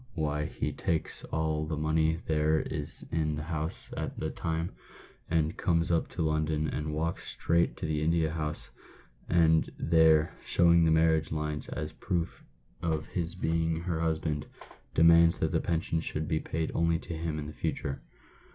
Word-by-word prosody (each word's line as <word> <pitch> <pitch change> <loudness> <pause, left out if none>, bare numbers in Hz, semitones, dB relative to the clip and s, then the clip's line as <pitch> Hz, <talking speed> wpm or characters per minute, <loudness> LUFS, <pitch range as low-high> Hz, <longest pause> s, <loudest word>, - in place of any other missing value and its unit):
why 75 -2 -1
he - - -3
takes 80 -2 -2
all 80 -1 -1
the 80 -1 -3
money 80 +1 +1
there 80 0 +2
is 75 -2 +1
in 75 -2 0
the 75 - -4
house 80 0 -5
at - - -4
the - - -2
time, 80 +1 -2 0.6
and 80 -1 +1
comes 85 -3 +1
up 85 - +1
to 85 - -3
London, 80 0 0
and 75 +1 -3
walks 80 +2 -2
straight 85 +1 +1
to - - -4
the 75 -1 -1
India 80 -1 +2
House, 75 -1 -4 0.6
and 80 -2 +3
there, 80 -1 +4
showing 85 -1 +5
the - - +4
marriage 80 0 +3
lines 75 -1 -3
as 75 -1 -4
proof 85 +1 -3 0.4
of 80 -2 -1
his 85 -1 -2
being 80 -2 0
her 85 -2 -2
husband, 80 -2 -1 0.5
demands 85 +1 +6
that - - 0
the - - +2
pension 80 -1 -1
should 80 -1 -4
be 80 - 0
paid 80 +1 -3
only 85 0 +2
to 85 - -7
him 80 -1 -3
in 75 0 -5
future." 70 -1 -3
80 Hz, 165 wpm, -29 LUFS, 75-85 Hz, 0.6 s, demands